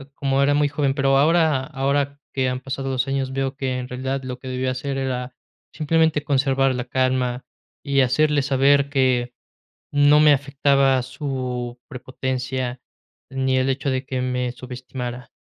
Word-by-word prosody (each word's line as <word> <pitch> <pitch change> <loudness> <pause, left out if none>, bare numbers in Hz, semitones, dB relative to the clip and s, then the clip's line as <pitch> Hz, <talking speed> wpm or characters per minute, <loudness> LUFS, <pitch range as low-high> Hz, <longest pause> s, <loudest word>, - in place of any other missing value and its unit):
como 135 0 0
era 145 +1 +3
muy 145 0 +2
joven, 140 -2 0
pero 135 -1 +3
ahora 155 -2 +3
ahora 140 0 -1
que 130 -1 +1
han 125 0 -3
pasado 135 0 -4
los 130 +1 0
años 135 -1 -1
veo 135 0 -2
que 130 -2 -2
en 125 - -5
realidad 130 +1 -3
lo 125 0 -6
que 130 - -10
debía 130 0 -1
hacer 135 +2 -3
era 125 -2 -3 0.4
simplemente 160 -1 +1
conservar 135 -2 +2
la 125 0 -3
calma, 130 -1 0 0.4
y 140 -1 +3
hacerle 145 +3 +2
saber 140 +1 +3
que 130 -3 +1 0.6
no 145 +1 +5
me 150 -1 +7
afectaba 140 -1 +2
su 125 -3 -4
prepotencia, 130 -1 -4 0.5
ni 130 0 0
el 130 +1 +1
hecho 135 +1 -1
de 130 0 -2
que 130 -1 -3
me 125 -1 -1
subestimara. 125 -1 -7
135 Hz, 160 wpm, -22 LUFS, 130-140 Hz, 0.6 s, me